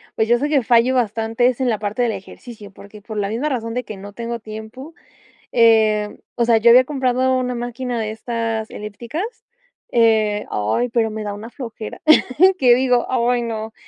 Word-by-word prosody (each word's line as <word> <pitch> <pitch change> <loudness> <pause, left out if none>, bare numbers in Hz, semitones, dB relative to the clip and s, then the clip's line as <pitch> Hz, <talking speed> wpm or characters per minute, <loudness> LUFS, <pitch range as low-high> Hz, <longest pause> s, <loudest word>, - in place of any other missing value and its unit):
pues, 220 - +1
yo 240 +1 +3
sé 290 +3 -1
que 280 -4 +2
fallo 240 +3 +3
bastante 225 0 0
es 255 +1 -1
en 250 - +1
la 220 - 0
parte 210 +3 -3
del 240 -2 +1
ejercicio. 205 +1 -11
Porque 200 +2 -14
por 215 0 -7
la 200 -1 -1
misma 245 +8 -2
razón 230 -3 -3
de 250 - -2
que 215 - -9
no 200 +1 -10
tengo 235 +1 -5
tiempo 220 +8 -9 0.6
eh, 220 -2 +3 0.2
o 235 - +1
sea, 230 -1 +4
yo 235 +2 +4
había 255 +1 +7
comprado 260 -2 0
una 250 -1 -2
máquina 240 0 -4
de 215 -1 -3
estas 225 0 -3
elípticas 235 - -6 0.7
eh, 220 -3 +2
ay, 110 - 0
pero 230 -1 +1
me 215 0 -5
da 205 -1 -4
una 215 +3 -9
flojera, 230 -4 -8 0.6
que 245 -2 +5
digo: 250 -1 +2
"Ay, 245 -1 +1
no". 220 -1 -5
230 Hz, 190 wpm, -20 LUFS, 215-245 Hz, 0.7 s, había